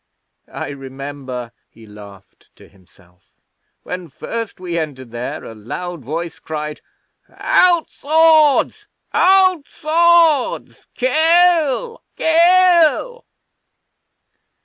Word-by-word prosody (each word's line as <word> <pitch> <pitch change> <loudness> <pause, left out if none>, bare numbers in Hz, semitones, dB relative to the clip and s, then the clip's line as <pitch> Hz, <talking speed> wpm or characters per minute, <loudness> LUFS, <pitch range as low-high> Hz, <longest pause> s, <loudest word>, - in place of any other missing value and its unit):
I - - -6
remember' 135 -3 -8 0.2
he 115 0 -18
laughed 100 -2 -16
to - - -18
himself 90 -1 -26 0.6
'when 180 -1 -7
first 230 +9 -7
we 180 -2 -5
entered 130 -6 -7
there 120 +1 -6
a - - -10
loud 150 +9 -7
voice 165 +6 -6
cried, 150 -1 -6 0.5
"Out 345 -3 +2
swords! 315 -1 +2 0.3
Out 370 -4 +3
swords! 330 -3 +1
Kill, 330 - +2
kill!" 350 +7 +3
220 Hz, 85 wpm, -18 LUFS, -, 0.6 s, Out